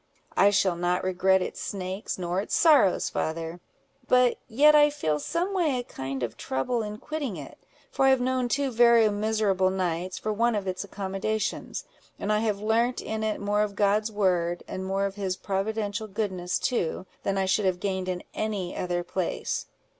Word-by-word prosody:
"I 200 - +6
shall 195 -3 +2
not 175 +1 0
regret 185 0 +3
its - - -6
snakes 190 0 -4
nor 180 +1 -1
its - - -2
sorrows, 290 - +5
father; 165 +2 -3 0.5
but 250 -1 +4
yet 290 +6 +5
I 295 0 +7
feel 155 - -1
someway 345 - 0
a 245 - -2
kind 135 - -5
of 115 -2 -4
trouble 135 - -1
in 210 -1 -5
quitting 275 - -4
it; 140 -3 -10 0.3
for 270 - +2
I - - +6
have 265 -1 +4
known 255 0 0
two 275 +1 0
very 235 -1 +6
miserable 205 -3 +1
nights, 185 -1 -2
for 215 - -2
want 230 +2 +2
of 205 -2 -2
its 185 +1 -2
accommodations; 200 +2 -3 0.3
and 210 - -1
I 210 - +2
have 215 -2 0
learnt 230 +4 +1
in 220 0 -3
it 215 -1 -1
more 205 +1 +1
of 210 -1 -1
God's 210 +2 +2
word, 180 -4 +1
and 185 - -5
more 195 +1 0
of 195 - -2
his 190 -2 -2
providential 205 +2 -2
goodness 190 -4 -2
too, 185 -8 -1 0.2
than 195 - -1
I 190 - +1
should 195 +2 +1
have 185 -1 +1
gained 190 -1 -2
in 180 -1 -3
any 205 -5 -3
other 175 -1 -2
place. 180 0 -3
200 Hz, 185 wpm, -27 LUFS, 185-225 Hz, 0.5 s, I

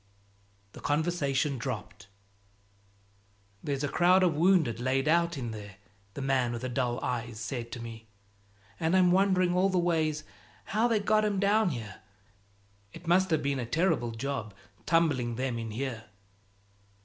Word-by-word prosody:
The - - -12
conversation 145 -3 0
dropped. 105 -6 -6 1.6
"There's 140 -1 -2
a - - +1
crowd 180 +5 +4
of 175 -3 +3
wounded 160 -7 +3
laid 130 +3 0
out 170 0 +2
in 120 -4 -4
there," 105 -2 -9 0.4
the 140 - -4
man 130 -3 +1
with 120 +1 -5
the 130 - -2
dull 125 -1 -1
eyes 120 -2 -3
said 120 -1 -5
to - - -6
me, 115 -1 -9 0.7
"and 165 +4 +2
I'm 180 -1 +5
wondering 185 -1 +3
all 185 +2 +3
ways 165 -4 +1 0.4
how 220 +4 +1
they 225 -3 +2
got 215 +1 +2
'em 205 -2 0
down 205 +1 +3
here. 110 - -7 0.9
It 170 - -11
must 185 +3 +3
have 160 -2 +1
been 140 -1 0
a 120 - -2
terrible 160 -3 +1
job, 115 -3 -4 0.3
tumbling 145 -8 +2
them 125 -1 -2
in 115 -1 -5
here." 115 0 -4
140 Hz, 150 wpm, -29 LUFS, 120-175 Hz, 1.6 s, I'm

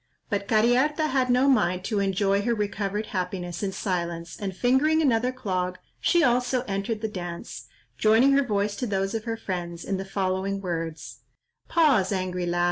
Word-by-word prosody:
But 200 -1 -1
Cariharta 255 +8 +3
had 260 -2 +1
no 250 +2 +4
mind 185 -9 +2
to 210 0 -1
enjoy 195 0 +1
her 235 +3 0
recovered 205 0 -2
happiness 180 -2 -3
in 200 -2 -1
silence 170 -3 -3
and 195 -2 -5
fingering 270 +6 +3
another 250 -5 +2
clog, 185 -7 -2 0.2
she 345 -2 +3
also 250 0 +2
entered 205 0 -3
the 220 - -1
dance, 175 -4 -7 0.3
joining 225 +5 +5
her 275 +1 +5
voice 205 -3 -1
to 250 - -2
those 195 -1 -1
of 225 0 -3
her 225 -1 -2
friends, 175 -5 -5
in 195 - -1
the 190 - -3
following 195 0 -1
words— 165 -4 -5 0.5
"Pause, 265 - +3
angry 180 -1 -2
lad! 175 0 0
200 Hz, 170 wpm, -26 LUFS, 185-245 Hz, 0.5 s, joining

